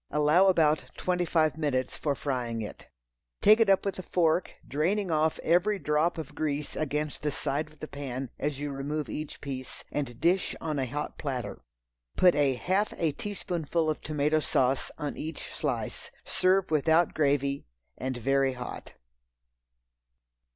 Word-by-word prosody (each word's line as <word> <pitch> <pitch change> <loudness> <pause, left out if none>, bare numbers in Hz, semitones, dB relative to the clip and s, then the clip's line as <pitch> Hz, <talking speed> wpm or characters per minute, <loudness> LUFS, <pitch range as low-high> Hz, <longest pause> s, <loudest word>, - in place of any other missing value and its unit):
Allow 150 +6 +4
about 160 -4 +3
twenty 180 -1 0
five 155 -3 +2
minutes 130 -4 0
for 145 -2 -1
frying 120 -6 -2
it. 105 - -9 0.5
Take 215 +2 +7
it 225 -3 +4
up 195 0 +4
with 195 -1 -2
a - - -2
fork, 175 -1 +1
draining 180 +6 0
off 155 0 +2
every 180 +5 +3
drop 150 +1 +1
of 150 -2 -6
grease 150 -1 -2
against 150 0 -2
the 150 - 0
side 150 0 -2
of 155 - -21
the 155 - -6
pan 135 -3 -5
as 145 -1 -2
you 145 0 -3
remove 145 +2 -3
each 155 0 -5
piece, 130 -2 -6
and 120 -5 -3
dish 180 +2 +2
on 155 -3 -2
a 130 - 0
hot 145 +4 -4
platter. 125 -8 -4 0.6
Put 180 -1 +6
a 140 -3 +3
half 190 +10 0
a 165 -3 +1
teaspoonful 170 -4 -2
of 155 - -5
tomato 150 +1 +1
sauce 130 -3 +1
on 150 -2 -4
each 160 +1 -6
slice. - - -3 0.2
Serve 185 -1 +2
without 160 +2 +3
gravy 140 - +1 0.3
and 130 -1 -3
very 135 +2 +2
hot. 125 -1 -7
150 Hz, 160 wpm, -29 LUFS, 140-170 Hz, 0.6 s, Take